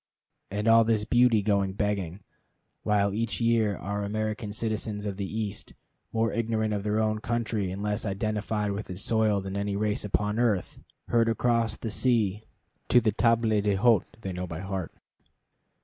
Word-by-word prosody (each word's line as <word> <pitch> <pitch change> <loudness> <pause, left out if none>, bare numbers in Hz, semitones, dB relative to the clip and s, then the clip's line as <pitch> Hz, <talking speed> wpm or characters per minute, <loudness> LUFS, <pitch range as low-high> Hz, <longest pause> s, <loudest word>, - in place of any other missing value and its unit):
And 105 +2 -2
all 115 0 +7
this 110 -2 +1
beauty 120 -2 +4
going 100 -2 +1
begging, 100 -3 -2 0.6
while 100 -2 +1
each 115 +2 -2
year 115 -4 +2
our 100 +1 -3
American 110 +1 -3
citizens 110 -1 -2
of 100 -2 -3
the 100 -2 -4
East, 105 -2 -5 0.4
more 115 -1 0
ignorant 110 -1 0
of 100 - -1
their 105 +1 0
own 110 0 +1
country 110 -4 -1
and 95 +3 -5
less 105 +1 -1
identified 105 0 -1
with 100 +1 -5
its 90 +2 -6
soil 110 -3 +2
than 95 0 -6
any 100 0 -1
race 105 0 -1
upon 105 +1 -1
earth, 110 -6 0 0.3
herd 115 -1 +3
across 115 -1 +1
the 115 - -4
sea 110 -3 +1 0.4
to 125 - +7
the 110 -2 +1
tables 115 +2 +2 0.2
d'hôte 105 +1 +3 0.2
they 95 -4 -4
know 90 +1 -4
by 80 0 -6
heart! 95 -2 -4
105 Hz, 165 wpm, -27 LUFS, 100-115 Hz, 0.6 s, all